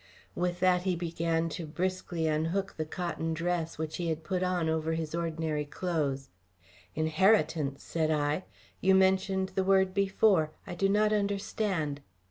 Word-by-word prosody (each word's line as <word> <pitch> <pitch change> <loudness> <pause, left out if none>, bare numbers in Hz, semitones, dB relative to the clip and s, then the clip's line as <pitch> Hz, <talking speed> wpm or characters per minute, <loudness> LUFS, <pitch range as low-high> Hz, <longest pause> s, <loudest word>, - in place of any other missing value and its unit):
With 175 0 -1
that 180 -1 +4
he 185 -1 0
began 165 -1 -1
briskly 175 +1 -3
to 160 - +2
unhook 165 +6 -1
the 155 -1 -3
cotton 165 -1 -3
dress 170 0 -2
which 155 0 -4
he 175 - -2
had 160 0 -2
put 185 +2 -2
on 180 -3 0
over 160 0 0
his 160 -1 -3
ordinary 160 -2 -1
clothes. 145 -4 -2 0.7
"Inheritance!" 155 -3 +2
said 160 -2 -1
I. 150 +3 0 0.3
"You 190 +1 +4
mentioned 190 0 +2
the 190 - -1
word 190 -1 +3
before. 195 -5 +3
I - - -6
do 195 +3 +1
not 210 +1 +3
understand." 200 -7 -1
170 Hz, 150 wpm, -30 LUFS, 155-190 Hz, 0.7 s, that